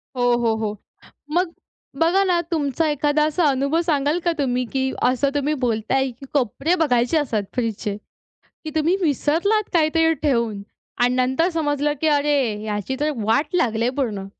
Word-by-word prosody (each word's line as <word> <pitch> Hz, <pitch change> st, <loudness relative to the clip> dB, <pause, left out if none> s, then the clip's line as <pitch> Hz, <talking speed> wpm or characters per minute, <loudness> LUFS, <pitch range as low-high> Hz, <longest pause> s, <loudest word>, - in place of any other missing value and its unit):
हो, 250 Hz, -, -2 dB, 0.2 s
हो, 230 Hz, -2 st, +1 dB
हो. 215 Hz, -1 st, -3 dB, 0.5 s
मग 345 Hz, 0 st, 0 dB, 0.5 s
बघा 355 Hz, +4 st, +3 dB
ना, 360 Hz, -2 st, +2 dB
तुमचा 310 Hz, 0 st, 0 dB
एखादा 295 Hz, +1 st, +1 dB
असा 310 Hz, +3 st, 0 dB
अनुभव 280 Hz, +5 st, +1 dB
सांगाल 300 Hz, 0 st, +1 dB
का 345 Hz, -, +3 dB
तुम्ही, 250 Hz, -2 st, 0 dB
की 265 Hz, 0 st, 0 dB
असं 260 Hz, +3 st, +2 dB
तुम्ही 290 Hz, +1 st, 0 dB
बोलताय 245 Hz, +3 st, 0 dB
की 250 Hz, +4 st, -13 dB
कोपरे 280 Hz, -, +1 dB
बघायचे 245 Hz, +2 st, +2 dB
असतात 230 Hz, -8 st, 0 dB
फ्रीजचे, 220 Hz, -4 st, -2 dB, 0.7 s
की 310 Hz, -, -4 dB
तुम्ही 320 Hz, +4 st, +2 dB
विसरलात 340 Hz, +8 st, +1 dB
काहीतरी 325 Hz, -1 st, +3 dB
ठेवून 235 Hz, -8 st, 0 dB, 0.4 s
आणि 245 Hz, +1 st, +2 dB
नंतर 260 Hz, +7 st, +1 dB
समजलं, 295 Hz, -2 st, 0 dB
की 320 Hz, -, 0 dB
अरे, 290 Hz, 0 st, +2 dB, 0.2 s
ह्याची 210 Hz, +4 st, -3 dB
तर 300 Hz, +1 st, +1 dB
वाट 285 Hz, -, +1 dB
लागली 230 Hz, -9 st, +1 dB
आहे 245 Hz, -, +2 dB
पूर्ण? 215 Hz, -8 st, -2 dB
285 Hz, 160 wpm, -22 LUFS, 245-315 Hz, 0.7 s, बघा